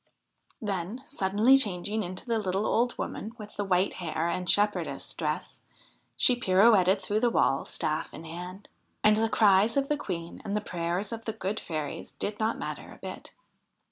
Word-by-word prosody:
Then, 205 +4 -3
suddenly 205 +7 +3
changing 210 -3 +1
into 185 -1 -5
the 230 -2 0
little 195 0 -1
old 240 +2 +1
woman 220 - -4
with 210 -2 -10
the 205 - -1
white 190 0 +2
hair 160 -1 -1
and 180 +1 -2
shepherdess 205 0 +1
dress, - - -3 0.6
she 250 - +5
pirouetted 195 -3 +4
through 210 +2 0
the 240 +1 +3
wall, 135 -11 +2
staff 155 +2 -2
in 160 - -9
hand. 180 +4 -8 0.4
And 215 0 +6
the 225 0 +2
cries 210 +2 +4
of 275 0 +1
the 295 - +2
Queen 170 -8 -5
and 205 +1 -1
the - - +2
prayers 175 0 -2
of 230 0 -6
the 220 - -2
good 215 -1 -3
fairies 155 -3 -5
did 205 0 -3
not 220 +1 0
matter - - -6
a - - -12
bit. - - -8
200 Hz, 175 wpm, -28 LUFS, 180-220 Hz, 0.6 s, And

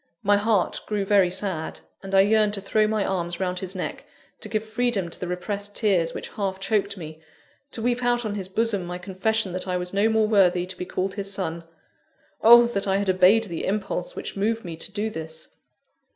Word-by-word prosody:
My 205 0 +4
heart 205 -2 +1
grew 205 -2 -1
very 195 -2 +4
sad; 185 -3 -3 0.2
and 195 0 -3
I 195 - +8
yearned 210 +1 +3
to 195 - -5
throw 215 +2 +2
my 215 -2 0
arms 175 -2 -2
round 180 -1 -2
his 190 +1 -5
neck, 180 - -4 0.4
to - - -8
give 215 -1 -1
freedom 220 -5 -1
to - - -7
the 180 - -4
repressed 200 +3 -4
tears 180 -6 +1
which - - -6
half 195 -2 -3
choked 200 0 0
me, 160 -2 -9 0.5
to 225 - -6
weep 245 +1 +1
out 240 -1 +1
on 210 - -2
his 195 -3 -4
bosom 210 -1 0
my 180 0 -4
confession 190 +2 -1
that 185 +1 -4
I 180 0 0
was 180 +1 -4
no 205 +3 +3
more 220 -1 +2
worthy 185 -4 +3
to 185 +1 -5
be 180 - -5
called 185 +1 -2
his 195 0 -4
son. 170 -4 -4 0.8
Oh, 235 +1 +9
that 200 -4 -2
I 195 0 +2
had 200 -1 +1
obeyed 185 +5 +5
the 170 -7 -3
impulse 195 -3 -2
which - - -6
moved 220 +2 -1
me 170 -2 -5
to 165 - -7
do 215 +2 -2
this! 160 -2 -8
195 Hz, 215 wpm, -24 LUFS, 180-215 Hz, 0.8 s, Oh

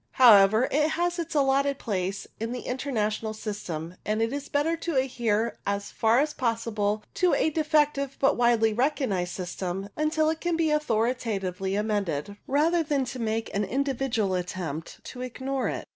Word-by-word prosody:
However, 220 -1 +7
it 300 +2 +2
has 345 +2 -1
its 335 -1 -4
allotted 275 0 +2
place 195 -4 -3
in 225 +2 -3
the 250 - -6
Inter 260 +3 -3
national 215 -2 -1
system, 180 -6 -5
and 215 +1 -1
it 225 +3 0
is 285 0 -5
better 295 +3 +1
to 330 -1 -3
adhere 235 -4 0
as 200 0 -2
far 225 +1 +2
as 295 +3 +2
possible 225 -3 -1
to 360 -1 +3
a 315 - +2
defective 295 -3 +1
but 275 - +3
widely 235 -2 +3
recognized 225 -8 0
system 185 +1 -4
until 310 +1 +1
it 320 - -5
can 345 -2 0
be 320 -2 +2
authoritatively 220 -9 -1
amended, 205 -5 -1
rather 315 +5 +3
than 285 -4 0
to 250 +1 -6
make 225 0 -2
an 200 - 0
individual 255 -3 0
attempt 175 -4 -4
to 250 - -8
ignore 260 +2 -3
it. - - -4
235 Hz, 165 wpm, -27 LUFS, 205-285 Hz, -, However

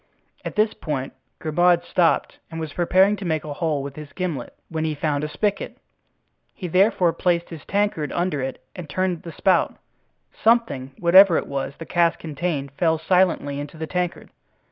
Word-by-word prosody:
At - - -6
this 215 0 +2
point 135 -4 -4 0.2
Grimaud 175 +2 +2
stopped 175 -1 +1
and 165 -1 -6
was 160 -2 -5
preparing 190 +3 +3
to 200 - -7
make 160 -4 -1
a 150 - -5
hole 150 -3 -1
with 140 0 -7
his 150 -2 -10
gimlet, 170 -10 -4
when 160 -1 -3
he 155 -1 -1
found 145 0 -1
a - - -1
spigot; 200 +7 -2 0.8
he 180 - -5
therefore 180 -1 +3
placed 170 -1 0
his 165 -4 -9
tankard 200 -7 0
under 175 -5 -1
it 130 0 -5
and 175 -4 -8
turned 185 0 -1
the 170 - -8
spout; 185 +1 +2 0.7
something, 225 - +2
whatever 180 0 +7
it - - -1
was 140 0 -4
the 165 - -8
cask 170 0 +2
contained, 150 -3 -3
fell 160 +3 +1
silently 160 -4 +1
into 145 +2 -7
the 160 - -4
tankard. 180 +1 -3
165 Hz, 175 wpm, -23 LUFS, 150-180 Hz, 0.8 s, whatever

